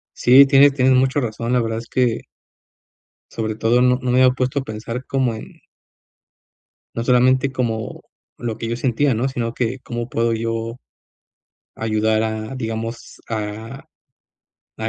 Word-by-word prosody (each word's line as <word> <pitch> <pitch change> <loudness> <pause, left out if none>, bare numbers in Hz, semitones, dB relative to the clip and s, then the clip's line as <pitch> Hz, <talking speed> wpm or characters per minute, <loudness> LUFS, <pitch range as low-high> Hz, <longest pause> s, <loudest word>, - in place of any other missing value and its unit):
Sí, 130 +3 +7
tienes 140 0 +6
tienes 130 -1 +3
mucha 130 +2 +2
razón. 115 -1 -3
La 125 - +3
verdad 115 0 -2
es 115 - -9
que 125 -3 0 1.1
sobre 110 -1 -3
todo, 115 +3 +2
no 125 0 +3
no 125 - -1
me 125 - +3
había 130 -1 +5
puesto 130 +2 -1
a - - -6
pensar 115 +2 -6
como 130 -4 0
en 110 - -11 1.3
no 115 - -3
solamente 130 +2 +3
como 115 -4 -3 0.4
lo 115 -2 -4
que 115 - -4
yo 115 - -2
sentía, 130 +2 +1
¿no?, 120 +5 0
sino 120 -3 -3
que 120 +1 -2
cómo 120 -1 -5
puedo 115 -1 0
yo, 115 +1 -3 1.0
ayudar 110 0 0
a, 110 +3 -4
digamos, 115 -1 -5
a 110 +3 -5 0.9
a 110 0 -2
120 Hz, 155 wpm, -20 LUFS, 110-130 Hz, 1.3 s, Sí